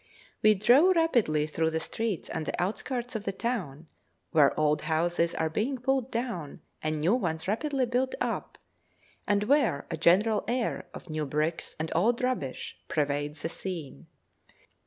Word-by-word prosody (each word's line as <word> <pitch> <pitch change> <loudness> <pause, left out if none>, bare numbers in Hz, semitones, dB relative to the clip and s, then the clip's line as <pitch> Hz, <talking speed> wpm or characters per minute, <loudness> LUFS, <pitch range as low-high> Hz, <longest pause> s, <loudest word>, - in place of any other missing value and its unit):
We 215 0 +6
drove 270 - +5
rapidly 235 - +2
through 160 +1 0
the 160 0 -1
streets 210 +2 -2
and 160 -2 -4
the - - -3
outskirts 240 +6 -2
of 215 - -3
the 200 - -1
town, 190 - -3 0.5
where 150 -3 +4
old 150 0 +2
houses 170 +1 +1
are 160 - +1
being 225 - -1
pulled 265 0 0
down 230 - -4 0.2
and 155 0 -1
new 170 +7 +3
ones 165 -9 -1
rapidly 265 +5 0
built 250 +2 0
up, - - -3 0.7
and 205 0 +2
where 240 - +2
a 165 - -2
general 205 +7 +4
air 240 0 -1
of 170 - -9
new 155 -1 -2
bricks 155 +4 -2
and 160 +1 -3
old 225 +9 +2
rubbish 250 - -2
pervades 145 0 -1
the 165 - -1
scene. 170 -6 -6
185 Hz, 155 wpm, -28 LUFS, 155-240 Hz, 0.7 s, We